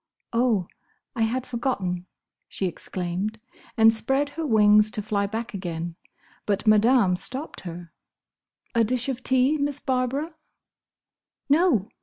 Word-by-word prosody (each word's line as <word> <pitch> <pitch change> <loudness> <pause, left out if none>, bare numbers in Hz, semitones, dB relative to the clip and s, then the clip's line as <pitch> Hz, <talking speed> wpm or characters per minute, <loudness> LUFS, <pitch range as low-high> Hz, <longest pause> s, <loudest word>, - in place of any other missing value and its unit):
"Oh! 230 -6 +2 0.5
I 230 - -2
had 240 +3 0
forgotten!" 200 -8 -2 0.4
she 195 - -2
exclaimed, 185 +4 -4 0.4
and 225 0 +6
spread 270 +6 0
her 320 +1 -4
wings 210 -2 +5
to 215 -1 -1
fly 200 -1 0
back 225 +3 -5
again, 170 -3 -5 0.5
but 200 0 0
Madame 215 -2 +4
stopped 265 - -4
her. 170 -1 -9 0.8
"A 230 - +3
dish 245 +3 0
of 255 -2 -3
tea, 260 +4 +3
Miss 285 0 0
Barbara?" 265 +5 -1 1.2
"No!" 285 - +3
225 Hz, 125 wpm, -25 LUFS, 200-260 Hz, 1.2 s, and